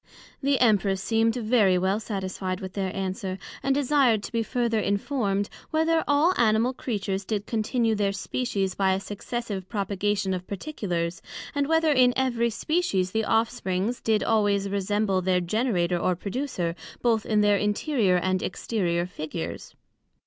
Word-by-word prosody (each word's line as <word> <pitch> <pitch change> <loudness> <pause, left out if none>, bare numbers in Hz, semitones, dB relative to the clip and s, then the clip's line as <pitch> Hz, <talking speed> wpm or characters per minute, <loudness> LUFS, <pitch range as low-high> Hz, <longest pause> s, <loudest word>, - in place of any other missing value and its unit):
The 275 -1 +2
Empress 205 -5 +3
seem'd 225 +3 +1
very 215 -5 +3
well 190 +3 +1
satisfied 190 -3 -4
with 190 -1 -7
their 190 -2 -2
answer, 190 0 -3 0.2
and 275 0 +1
desired 270 -6 +3
to - - -6
be 230 - 0
further 235 -1 0
informed, 200 -1 0 0.2
Whether 320 +1 +2
all 295 +5 +4
Animal 230 +2 +3
Creatures 200 -6 -3
did 205 0 -3
continue 225 +1 0
their 205 -2 +1
Species 200 -2 -2
by 190 0 +2
a 190 - 0
successive 205 -1 -5
propogation 200 -1 -1
of 180 0 -7
particulars, 180 - -3 0.3
and 285 -1 0
whether 320 0 +3
in 250 -3 +4
every 240 -3 +1
Species 225 - 0
the 220 +1 0
off 225 +1 +2
springs 200 0 -2
did 220 -1 +1
always 205 -3 +2
resemble 200 0 0
their 185 0 +2
Generator 180 -2 0
or 180 +1 +1
Producer, 190 -4 -3 0.3
both 225 -3 +2
in 215 -1 +2
their 205 -1 +4
interior 210 - +1
and 185 +1 0
exterior 175 -4 -1
Figures? 150 - -6
210 Hz, 150 wpm, -26 LUFS, 190-240 Hz, 0.3 s, all